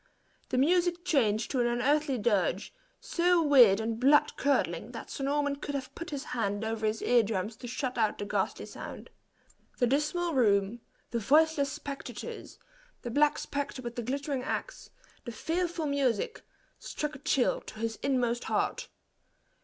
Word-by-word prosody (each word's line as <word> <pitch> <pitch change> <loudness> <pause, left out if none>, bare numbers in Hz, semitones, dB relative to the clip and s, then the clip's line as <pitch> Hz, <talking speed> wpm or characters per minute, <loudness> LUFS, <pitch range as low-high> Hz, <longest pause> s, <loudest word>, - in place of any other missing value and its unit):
The 255 - -1
music 345 +4 +2
changed 220 - +1
to 265 - 0
an 240 - +3
unearthly 270 +3 +1
dirge, 205 -4 0 0.3
so 355 0 +2
weird 245 -9 +7
and 225 0 -2
blood 280 +4 +4
curdling, 280 0 0
that - - -8
Sir 275 - -5
Norman 285 0 0
could 285 0 -5
have 265 -2 -5
put 335 +1 -7
his 280 -2 -4
hands 210 -3 -2
over 220 -1 -1
his 215 +1 -2
ear 245 -1 +5
drums 210 0 -3
to 245 - -8
shut 255 0 -3
out 215 -2 +1
the 205 - -4
ghastly 205 - -2
sound. - - -9 0.7
The 245 - +3
dismal 305 +7 0
room, 210 -3 +2 0.3
the 235 - 0
voiceless 290 +3 +3
spectators, 280 0 -7 0.5
the 240 - -4
black 295 +4 +3
spectre 280 -2 -4
with 240 0 -6
the 240 - -2
glittering 275 +3 -2
axe, - - -4 0.3
the 240 - -6
fearful 335 +5 -2
music, 280 - 0 0.4
struck 300 0 -4
a 270 - -9
chill 270 -2 +1
to - - -11
his 225 0 -2
inmost 245 -3 0
heart. - - -1
260 Hz, 160 wpm, -30 LUFS, 230-295 Hz, 0.7 s, weird